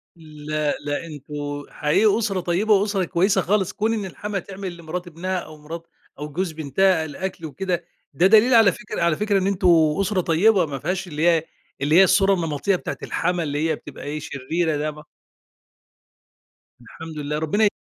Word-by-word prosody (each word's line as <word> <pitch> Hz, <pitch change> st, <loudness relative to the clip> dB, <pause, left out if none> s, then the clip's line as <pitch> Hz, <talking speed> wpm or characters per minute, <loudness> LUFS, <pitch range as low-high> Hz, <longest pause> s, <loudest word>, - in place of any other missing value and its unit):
لأ، 155 Hz, -2 st, -3 dB
لأ، 145 Hz, +3 st, -2 dB
انتم 145 Hz, -1 st, -6 dB
حقيقي 200 Hz, +8 st, +2 dB
أسرة 200 Hz, -4 st, -1 dB
طيبة 185 Hz, +5 st, +1 dB
وأسرة 200 Hz, -1 st, +2 dB
كويسة 190 Hz, +3 st, +2 dB
خالص. 195 Hz, 0 st, 0 dB
كون 220 Hz, +2 st, 0 dB
إن 210 Hz, -3 st, -2 dB
الحماة 200 Hz, +2 st, -4 dB
تعمل 190 Hz, -2 st, -7 dB
لمرات 175 Hz, +2 st, -6 dB
ابنها 185 Hz, +3 st, -3 dB
أو 155 Hz, -2 st, -10 dB
مرات 165 Hz, +3 st, -9 dB, 0.3 s
أو 150 Hz, +1 st, -5 dB
جوز 175 Hz, +3 st, -2 dB
بنتها 160 Hz, +3 st, +1 dB
الأكل 170 Hz, +2 st, -5 dB
وكده، 175 Hz, +2 st, -3 dB, 0.3 s
ده 170 Hz, +7 st, +4 dB
دليل 220 Hz, +5 st, +6 dB
على 220 Hz, -4 st, +7 dB
فكرة -, -, -6 dB
على 170 Hz, -2 st, +3 dB
فكرة 205 Hz, 0 st, +1 dB
إن 190 Hz, -, 0 dB
أنتم 195 Hz, -2 st, +1 dB, 0.3 s
أسرة 195 Hz, -1 st, +1 dB
طيبة 180 Hz, +3 st, +3 dB
ما 140 Hz, -3 st, -5 dB
فيهاش 185 Hz, +4 st, -2 dB
اللي 155 Hz, +1 st, 0 dB
هي 165 Hz, -2 st, +4 dB, 0.4 s
اللي 150 Hz, +3 st, +2 dB
هي 190 Hz, -, +9 dB
الصورة 195 Hz, +1 st, +4 dB
النمطية 165 Hz, +1 st, 0 dB
بتاعة -, -, -5 dB
الحماة، 175 Hz, 0 st, -1 dB
اللي 150 Hz, +2 st, -1 dB
هي 160 Hz, -, +1 dB
بتبقى 145 Hz, -2 st, -11 dB
إيه، 145 Hz, +2 st, -4 dB
شريرة 155 Hz, +3 st, -2 dB
ده 155 Hz, +1 st, -2 dB
ما 150 Hz, 0 st, -12 dB, 1.8 s
الحمد 160 Hz, +6 st, -10 dB
لله، 150 Hz, 0 st, -3 dB
ربنا 205 Hz, +8 st, +2 dB
170 Hz, 175 wpm, -23 LUFS, 150-195 Hz, 1.8 s, هي